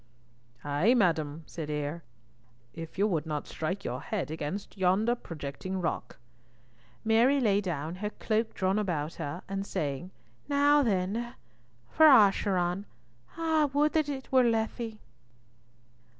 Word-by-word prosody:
"Ay, 145 - +3
madam," 160 - +1
said 155 -2 -6
Eyre, 150 +2 -3 0.7
"if 165 +1 -8
you 200 - +3
would 165 -7 -1
not 150 -2 -3
strike 180 +5 -3
your 125 +2 -3
head 185 -1 -3
against 160 +5 -5
yonder 195 +5 +2
projecting 165 - -6
rock." 170 - -3 0.9
Mary 235 +6 +4
lay 205 -5 +3
down, 165 -2 -4
her 210 +2 -3
cloak 220 +1 -1
drawn 190 +2 +1
about 165 -6 -2
her, 145 +6 -5
and 195 0 -3
saying, 150 -2 -3 0.4
"Now 290 +1 +4
then, 225 +2 -1 0.5
for 315 0 +6
Acheron. 195 -6 +4 0.5
Ah! 320 -3 +2
would 295 +1 +3
that 310 -2 +1
it 270 -2 -6
were 260 -1 +5
Lethe!" 225 -1 -1
195 Hz, 130 wpm, -29 LUFS, 160-235 Hz, 0.9 s, for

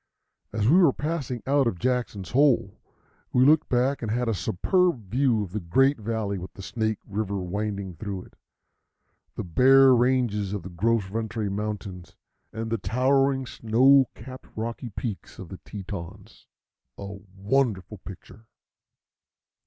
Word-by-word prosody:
As 110 0 0
we 160 +8 +6
were 175 -7 +6
passing 145 -6 -3
out 140 -1 +3
of 95 - -1
Jackson's 120 -5 -2
Hole, 130 -6 +2 0.5
we 125 +1 +4
looked 150 +2 +4
back 130 +3 +1
and 115 - -3
had 120 +2 -1
a 115 - +1
superb 120 - 0
view 125 -4 +2
of 95 - -8
the 105 - -3
great 135 +11 +2
valley 105 -3 -2
with 90 - -8
the 95 - -9
Snake 110 +1 -2
River 100 -1 -3
winding 100 +1 -3
through 95 0 -5
it, - - -19 1.0
the - - -4
bare 130 +9 +6
ranges 120 -5 +1
of 100 -4 -4
the 95 - -8
Gros 110 +5 +1
Ventre 110 0 -3
Mountains, 100 -3 -5 0.4
and 110 0 -5
the 115 - 0
towering 135 +4 +2
snow 130 +4 +4
capped 130 0 -11
rocky 115 +2 -4
peaks 105 -1 -6
of 95 - -9
the 95 - -8
Tetons 95 -4 -9 0.5
a 100 - -7
wonderful 100 +1 -2
picture. 100 +4 -12
110 Hz, 145 wpm, -26 LUFS, 100-130 Hz, 1.0 s, we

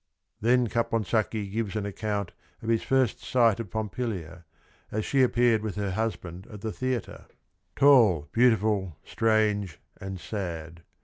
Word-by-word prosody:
Then 120 +2 +3
Caponsacchi 110 -2 -1
gives 110 -1 -2
an 105 -2 -2
account 100 -1 -3 0.3
of 110 - -4
his 115 -1 +2
first 130 -4 +1
sight 115 -4 +3
of 115 -5 -5
Pompilia, 95 -6 -4 0.5
as 110 0 -2
she 135 - +2
appeared 120 -3 +3
with 105 -4 -4
her 100 -2 -2
husband 95 -3 -4
at 105 -3 -10
the 110 - -3
theatre 130 0 -4 0.2
— - - -47
" - - -46
tall, 115 - +5
beautiful, 105 - +2
strange 105 -5 +1 0.2
and 95 -1 -6
sad." 85 -5 -5
110 Hz, 145 wpm, -27 LUFS, 95-115 Hz, 0.5 s, tall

